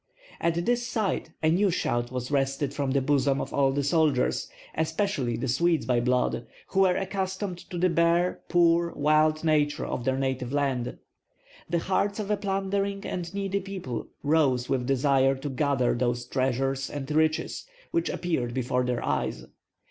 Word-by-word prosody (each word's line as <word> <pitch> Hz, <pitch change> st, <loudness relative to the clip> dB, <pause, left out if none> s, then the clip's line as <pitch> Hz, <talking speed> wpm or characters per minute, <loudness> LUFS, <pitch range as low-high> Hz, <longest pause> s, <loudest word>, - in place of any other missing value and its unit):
At 170 Hz, +1 st, 0 dB
this 240 Hz, 0 st, +1 dB
sight 210 Hz, -9 st, -1 dB
a 155 Hz, -, +4 dB
new 195 Hz, +4 st, +3 dB
shout 120 Hz, -7 st, -1 dB
was 125 Hz, +1 st, -4 dB
wrested 135 Hz, 0 st, 0 dB
from 140 Hz, -1 st, -1 dB
the 135 Hz, 0 st, +1 dB
bosoms 140 Hz, -1 st, +2 dB
of -, -, -5 dB
all 135 Hz, -1 st, +3 dB
the 140 Hz, +1 st, -1 dB
soldiers, 145 Hz, -3 st, +1 dB, 0.2 s
especially 160 Hz, -, -1 dB
the 120 Hz, -, -3 dB
Swedes 165 Hz, +6 st, +2 dB
by 125 Hz, -2 st, +2 dB
blood, 125 Hz, 0 st, 0 dB, 0.2 s
who 195 Hz, -, 0 dB
were 185 Hz, -2 st, +5 dB
accustomed 190 Hz, -1 st, -3 dB
to 180 Hz, -, -5 dB
the 180 Hz, +2 st, +3 dB
bare, 170 Hz, +1 st, +2 dB
poor, 170 Hz, -1 st, +3 dB
wild 155 Hz, +1 st, +3 dB
nature 150 Hz, -2 st, +2 dB
of 125 Hz, -, -3 dB
their 130 Hz, +1 st, +1 dB
native 130 Hz, -2 st, -2 dB
land. 135 Hz, -4 st, -1 dB, 0.7 s
The 170 Hz, -, +1 dB
hearts 195 Hz, +3 st, 0 dB
of 210 Hz, -1 st, -2 dB
a 210 Hz, -, +2 dB
plundering 195 Hz, 0 st, -1 dB
and 175 Hz, -2 st, -4 dB
needy 200 Hz, 0 st, -1 dB
people 185 Hz, -11 st, -5 dB, 0.2 s
rose 140 Hz, -5 st, +2 dB
with 125 Hz, -2 st, -1 dB
desire 135 Hz, 0 st, +3 dB
to 135 Hz, +2 st, -5 dB
gather 135 Hz, -2 st, +1 dB
those 120 Hz, 0 st, -1 dB
treasures 135 Hz, +1 st, -1 dB
and 145 Hz, 0 st, -5 dB
riches 155 Hz, -, 0 dB, 0.2 s
which 170 Hz, -, 0 dB
appeared 130 Hz, -9 st, -2 dB
before 125 Hz, 0 st, 0 dB
their 125 Hz, -1 st, -1 dB
eyes. -, -, -1 dB
145 Hz, 165 wpm, -27 LUFS, 130-175 Hz, 0.7 s, were